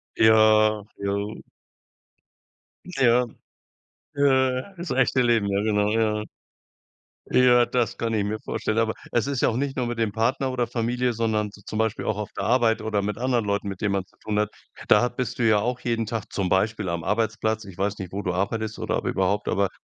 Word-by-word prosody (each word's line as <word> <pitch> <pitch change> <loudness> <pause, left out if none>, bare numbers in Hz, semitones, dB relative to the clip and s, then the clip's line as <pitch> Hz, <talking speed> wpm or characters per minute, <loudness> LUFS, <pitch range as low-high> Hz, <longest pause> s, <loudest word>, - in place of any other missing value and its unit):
Ja. 110 -1 +5
Ja. 100 +1 -3 1.5
Ja. 125 -8 +3 0.9
Ja. 130 +3 +2
Das 175 0 -6
echte 130 0 +2
Leben, 115 -4 +2
ja, 100 0 0
genau, 105 -1 +1
ja. 110 -1 +1 1.1
Ja, 125 -1 +5
das 120 -2 -1
kann 115 -1 -2
ich 105 -2 +1
mir 105 +2 -2
vorstellen, 110 - -2
aber 115 -1 +2 0.2
es 120 - +1
ist 140 -2 -2
ja - - +4
auch 115 - -2
nicht 140 0 -2
nur 125 -2 0
mit 120 - -4
dem 115 -2 0
Partner 125 +5 0
oder 120 -2 -1
Familie, 120 +1 -1
sondern 110 -2 -1
z 105 - -17
zum 110 - -4
Beispiel 110 -1 -1
auch 110 -1 -1
auf 105 - -4
der - - -2
Arbeit 115 -2 +2
oder 105 -2 0
mit 105 +1 -3
anderen 120 -3 0
Leuten, 100 0 -1
mit 95 -1 -6
denen 100 -2 0
man 95 -1 -1
zu - - -30
tun. 105 0 0 0.4
Da 120 +4 +5
bist 125 0 -4
du 120 - +1
ja 110 -1 +5
auch 125 +4 -1
jeden 115 -2 -1
Tag 115 -1 -5
zum 95 -3 -1
Beispiel 105 +1 +1
am 85 -1 -2
Arbeitsplatz, 110 +2 -1
ich 95 -3 -11
weiß 100 +1 -1
nicht, 95 -2 -7
wo 100 +1 -3
du 90 - -2
arbeitest 110 +4 -2
oder - - -1
ob - - -4
überhaupt, 100 +2 0
aber 100 -1 +1
110 Hz, 200 wpm, -24 LUFS, 105-120 Hz, 1.5 s, Ja